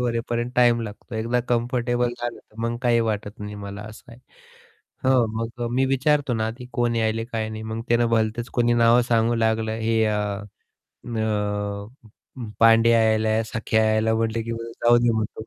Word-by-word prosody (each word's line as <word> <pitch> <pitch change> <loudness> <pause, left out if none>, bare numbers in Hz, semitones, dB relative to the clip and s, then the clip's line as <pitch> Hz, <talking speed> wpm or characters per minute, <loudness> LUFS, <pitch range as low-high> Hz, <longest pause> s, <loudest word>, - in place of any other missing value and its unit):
होण्यापर्यंत 120 0 -2
time 120 -1 +4
लागतो. 110 +2 -9
एकदा 115 +3 0
comfortable 120 0 0
झालं 120 0 -4
तर 105 - -23
मग 115 0 -1
काही 120 -1 +3
वाटत 105 -1 -4
नाही 105 0 -6
मला 100 0 -7
असं 110 +2 -13
आहे. 115 - -14 0.9
हं, 130 -2 +4
मग 115 +1 -4
मी 130 - +3
विचारतो 140 +1 +1
ना 110 -1 -1
आधी, 120 +3 -6
की 125 - -14
कोण 120 -1 0
यायलंय 110 0 0
काय 110 -1 -2
नाही, 110 0 -6
मग 110 +1 -5
त्यानं 120 0 +3
भलतंच 115 +1 0
कोणी 120 0 +3
नावं 120 +1 +5
सांगू 115 0 +2
लागलं, 110 -1 0
हे 115 0 +1
अ, 105 -1 +1 0.2
अ, - - -10 1.9
उम्म, 120 -4 -7
पांडे 115 0 +6
यायला, 110 -1 +3
सखे 110 0 -2
यायला. 110 0 +3
म्हटलं 115 0 -1
की 115 - -5
जाऊदे 120 +1 +2
म्हणतो. 110 0 -3
115 Hz, 170 wpm, -23 LUFS, 110-120 Hz, 1.9 s, पांडे